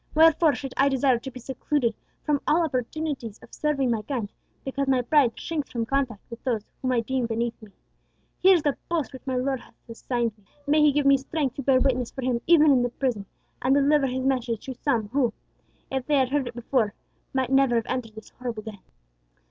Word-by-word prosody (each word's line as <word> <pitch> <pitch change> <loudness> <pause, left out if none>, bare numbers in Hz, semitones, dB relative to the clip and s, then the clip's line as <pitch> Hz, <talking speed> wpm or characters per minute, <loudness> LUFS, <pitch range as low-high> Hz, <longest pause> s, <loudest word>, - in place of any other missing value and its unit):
Wherefore 320 -1 +5
should 270 0 -6
I 275 +1 +4
desire 265 -2 +2
to 265 - -7
be 255 - -10
secluded 255 0 -1 0.3
from 295 -2 +1
all 335 +3 +4
opportunities 265 -4 -3
of - - -16
serving 275 -4 0
my 225 -2 0
kind, 220 -2 -4 0.3
because 275 +1 -2
my 260 -2 +2
pride 255 -2 +3
shrinks 310 -4 -3
from 230 -2 -2
contact 255 -5 -1
with 235 - -9
those 230 -5 -1 0.2
whom 255 - 0
I 235 - +2
deem 255 +1 -1
beneath 230 +1 -2
me? 215 - -13 0.7
Here 380 0 +7
is 330 - 0
the 290 -2 0
post 325 -5 -1
which 260 +1 -11
my 260 - -1
Lord 260 +1 0
has - - -18
assigned 235 -1 -2
me. - - -27 0.2
May 300 +2 +3
He 300 -1 +6
give 290 0 0
me 275 0 +6
strength 275 -1 -2
to - - -2
bear 265 -1 +4
witness 255 -3 +1
for 265 - -7
Him 245 -2 0
even 310 -3 +6
in 260 -3 +4
the 245 - 0
prison, 235 -6 -2 0.3
and 265 +2 +3
deliver 285 0 +3
His 260 0 -2
message 245 -4 -1
to 265 - -4
some 230 -5 -1
who, 250 -2 +1 0.6
if 265 -1 -2
they 300 - +3
had 260 -2 +3
heard 280 -2 0
it 240 - -7
before, 235 -3 0 0.4
might 265 -1 -1
never 270 -2 +4
have 230 -1 +1
entered 235 -4 -3
this 220 - -11
horrible 240 -4 -6
den." 215 -2 -8
260 Hz, 220 wpm, -25 LUFS, 235-280 Hz, 0.7 s, Here